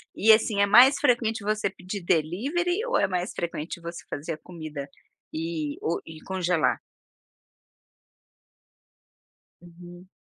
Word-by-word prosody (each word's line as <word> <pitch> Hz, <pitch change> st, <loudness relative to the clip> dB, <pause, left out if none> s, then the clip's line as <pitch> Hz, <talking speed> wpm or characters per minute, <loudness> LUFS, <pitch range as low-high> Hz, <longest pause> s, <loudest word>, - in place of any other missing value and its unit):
E, 220 Hz, +2 st, +5 dB
assim, 215 Hz, -2 st, +2 dB
é -, -, +6 dB
mais 245 Hz, +7 st, +7 dB
frequente 235 Hz, -6 st, +1 dB
você 215 Hz, 0 st, 0 dB
pedir 190 Hz, +2 st, -7 dB
delivery 275 Hz, -, 0 dB
ou -, -, +1 dB
é -, -, +2 dB
mais 180 Hz, +1 st, -2 dB
frequente 170 Hz, 0 st, -4 dB
você 170 Hz, 0 st, -7 dB
fazer 160 Hz, +3 st, -4 dB
a 155 Hz, -, -7 dB
comida 155 Hz, -4 st, -8 dB, 0.4 s
e 155 Hz, -2 st, -3 dB
o 165 Hz, -, -1 dB
e 160 Hz, -1 st, -10 dB
congelar? 180 Hz, -3 st, 0 dB, 2.8 s
Uhum. 175 Hz, +1 st, -13 dB
180 Hz, 125 wpm, -26 LUFS, 165-215 Hz, 2.8 s, mais